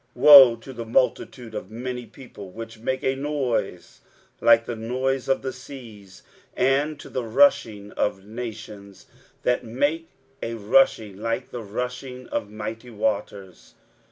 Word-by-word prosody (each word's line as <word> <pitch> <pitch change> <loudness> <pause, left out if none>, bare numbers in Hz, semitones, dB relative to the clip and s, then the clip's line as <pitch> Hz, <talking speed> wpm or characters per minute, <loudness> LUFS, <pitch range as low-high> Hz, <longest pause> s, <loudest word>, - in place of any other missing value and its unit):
23:017:012 - - -8
Woe 135 -5 +11
to 125 +3 -11
the 115 -2 -6
multitude 120 0 0
of 95 - -6
many 125 +1 -6
people, 110 -4 -12
which 115 +3 -9
make 130 +3 -2
a 130 - +1
noise 135 -10 -3 0.4
like 115 0 +5
the 120 - -4
noise 130 +4 -2
of 135 - +1
the 130 - -3
seas; 115 -8 -12 0.3
and 140 +3 +1
to - - -10
the 130 - -3
rushing 110 - +2
of 95 -1 -2
nations, 110 -3 -8 0.4
that 125 - +1
make 145 +8 -1 0.3
a 115 - -4
rushing 110 -2 +2
like 115 +4 -3
the 120 - -5
rushing 125 +4 -6
of 105 - -3
mighty 110 +3 -7
waters! 100 -4 -4
115 Hz, 145 wpm, -24 LUFS, 110-130 Hz, 0.4 s, Woe